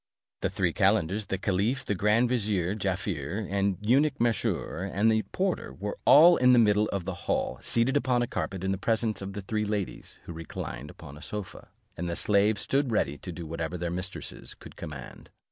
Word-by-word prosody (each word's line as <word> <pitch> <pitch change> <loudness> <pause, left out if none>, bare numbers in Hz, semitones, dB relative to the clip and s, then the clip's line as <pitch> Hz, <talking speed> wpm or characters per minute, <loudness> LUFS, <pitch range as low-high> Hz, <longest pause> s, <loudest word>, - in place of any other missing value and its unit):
The - - +1
three - - 0
calendars, 100 +5 +2
the 95 - -1
caliph, 100 +6 0
the - - 0
grand 105 +5 +3
vizier, 105 -7 0
Jaaffier, 95 -2 -2
the 100 0 +1
eunuch 140 +4 +3
Mesrour, 105 -5 -1
and 110 +3 +3
the 110 0 +2
porter, 190 -1 -1
were 105 +2 -5
all 170 +4 +8
in 125 0 +5
the - - +6
middle 105 -2 +4
of 95 -3 -3
the 95 - -2 0.2
hall, - - 0
seated 120 +4 +1
upon 125 -3 +2
a - - -2
carpet 95 -4 -3
in 95 - 0
the 95 - -2
presence 110 0 0
of 95 0 -5
the 100 - -5
three 105 +2 -2
ladies, 105 -2 -4
who 85 - -8
reclined 75 -4 -6
upon 70 0 -11
a - - -12
sofa, 105 0 -6 0.3
and 85 +1 -3
the 85 - -2
slaves 100 +1 +2
stood 135 -2 +1
ready 75 -9 +1
to 90 - -6
do 85 0 -7
whatever 85 +2 -4
their 85 0 -3
mistresses 90 +2 -5
should - - -12
command. 70 -5 -9
100 Hz, 195 wpm, -28 LUFS, 90-115 Hz, 0.3 s, all